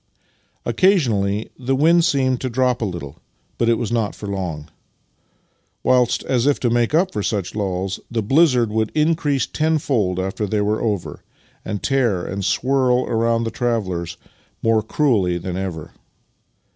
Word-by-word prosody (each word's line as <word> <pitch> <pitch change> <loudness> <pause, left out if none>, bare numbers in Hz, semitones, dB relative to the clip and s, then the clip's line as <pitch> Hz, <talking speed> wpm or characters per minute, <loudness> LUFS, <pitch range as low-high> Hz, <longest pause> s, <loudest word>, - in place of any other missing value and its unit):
Occasionally 110 - +1
the 130 +1 0
wind 165 +5 +4
seemed 130 -7 +1
to 130 - -2
drop 125 0 +1
a - - +1
little, 85 -8 -6 0.4
but 115 - +2
it 115 - +4
was 120 -1 -3
not 115 -3 -1
for - - -9
long; 90 -7 -4 1.2
whilst, 125 -2 +2
as 125 0 +1
if 145 - +2
to 120 - +1
m.ake 120 +4 +1
up 185 +3 +2
for 105 - -2
such 100 -3 -2
lulls, 95 -2 -2
the 115 -2 -1
blizzard 125 -2 +3
would 110 0 0
increase 150 -3 +1
ten 160 +1 0
fold 105 -11 0
after 95 +3 -2
they 105 +1 0
were 105 +1 0
over, 105 -6 -3 0.4
and 105 -2 -5
tear 120 -10 +1
and 100 +1 -4
swirl 130 +3 +2
around 115 0 +1
the 115 - -3
travellers 95 -9 -2 0.5
more 115 -1 +3
cruelly 110 -7 +1
than 90 +1 -5
ever. 90 -5 -5
115 Hz, 160 wpm, -20 LUFS, 100-130 Hz, 1.2 s, wind